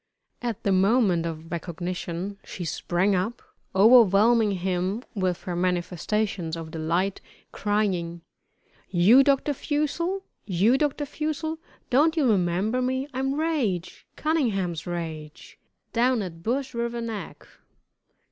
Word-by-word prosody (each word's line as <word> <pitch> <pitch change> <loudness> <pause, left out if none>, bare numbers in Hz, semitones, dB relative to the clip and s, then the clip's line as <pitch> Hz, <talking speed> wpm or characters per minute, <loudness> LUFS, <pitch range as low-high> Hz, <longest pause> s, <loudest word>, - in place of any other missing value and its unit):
At 235 -4 -3
the 200 - +1
moment 190 -3 +3
of 165 0 -7
recognition 175 +3 -4
she 175 - -7
sprang 175 +5 0
up, 195 +6 -2 0.3
overwhelming 220 +1 +6
him 185 +4 -1
with 185 -4 -1
her 180 - -3
manifestations 180 0 -1
of 160 -1 -7
delight, 170 +5 -1 0.3
crying: 190 -5 -1 0.7
"You 200 +10 +6
Dr. 280 +1 +2
Fussell? 310 +7 -1 0.2
You 200 +6 +3
Dr. 295 0 0
Fussell? 310 +2 -3 0.3
Don't 310 +6 +4
you 290 -5 +3
remember 200 +4 +1
me? 260 +2 -1
I'm 270 +1 -1
Rache 270 - 0 0.2
Cunningham's 195 - -1
Rache, 160 -3 -6 0.3
down 240 -1 +2
at 165 -3 -8
Bush 255 +7 -2
River 235 0 -2
Neck." 230 -3 -6
200 Hz, 115 wpm, -26 LUFS, 175-255 Hz, 0.7 s, overwhelming